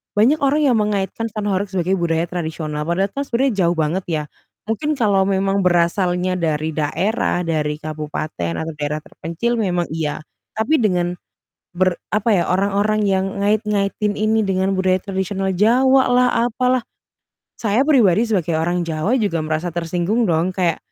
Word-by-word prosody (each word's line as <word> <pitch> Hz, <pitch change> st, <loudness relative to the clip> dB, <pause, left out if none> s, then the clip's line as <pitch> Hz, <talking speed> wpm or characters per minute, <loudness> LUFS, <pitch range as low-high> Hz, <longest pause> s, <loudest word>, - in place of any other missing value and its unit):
banyak 250 Hz, +9 st, +4 dB
orang 285 Hz, +2 st, +2 dB
yang 250 Hz, -5 st, +3 dB
mengaitkan 210 Hz, +2 st, -1 dB
sound 210 Hz, -1 st, -3 dB
horeg 195 Hz, +2 st, 0 dB
sebagai 185 Hz, 0 st, 0 dB
budaya 165 Hz, 0 st, 0 dB
tradisional, 160 Hz, -3 st, -4 dB
padahal 190 Hz, +3 st, 0 dB
kan 280 Hz, -, -2 dB
sebenarnya 255 Hz, +2 st, +1 dB
jauh 170 Hz, -, +1 dB
banget 160 Hz, +4 st, -1 dB
ya. 155 Hz, -3 st, -1 dB, 0.4 s
Mungkin 295 Hz, +8 st, -1 dB
kalau 205 Hz, -6 st, +2 dB
memang 195 Hz, 0 st, +1 dB
berasalnya 180 Hz, +1 st, +1 dB
dari 155 Hz, -1 st, -1 dB
daerah, 180 Hz, +6 st, 0 dB
dari 150 Hz, -2 st, -1 dB
kabupaten 150 Hz, -, -4 dB
atau 160 Hz, 0 st, -4 dB
daerah 150 Hz, +1 st, -2 dB
terpencil 205 Hz, +9 st, -3 dB
memang 180 Hz, -4 st, 0 dB
iya, 155 Hz, -2 st, -3 dB, 0.4 s
tapi 265 Hz, +9 st, +2 dB
dengan 180 Hz, -4 st, +1 dB, 0.6 s
ber 185 Hz, -1 st, +2 dB, 0.2 s
apa 210 Hz, +2 st, 0 dB
ya, 180 Hz, -4 st, +3 dB
orang-orang 200 Hz, +3 st, +1 dB
yang 190 Hz, 0 st, +1 dB, 0.2 s
ngait-ngaitin 210 Hz, 0 st, 0 dB
ini 220 Hz, +1 st, +2 dB
dengan 190 Hz, 0 st, 0 dB
budaya 185 Hz, 0 st, +2 dB
tradisional 190 Hz, 0 st, -2 dB
Jawa 260 Hz, +6 st, +4 dB
lah, 250 Hz, 0 st, +4 dB, 0.2 s
apalah, 250 Hz, +1 st, +1 dB, 0.8 s
saya 220 Hz, +3 st, +2 dB
pribadi 230 Hz, -, +4 dB
sebagai 180 Hz, -6 st, 0 dB
orang 175 Hz, +2 st, 0 dB
Jawa 160 Hz, +8 st, 0 dB
juga 200 Hz, -7 st, 0 dB
merasa 155 Hz, +3 st, -2 dB
tersinggung 175 Hz, +7 st, 0 dB
dong, 165 Hz, +2 st, +1 dB
kayak 175 Hz, -4 st, 0 dB
190 Hz, 150 wpm, -20 LUFS, 170-215 Hz, 0.8 s, banyak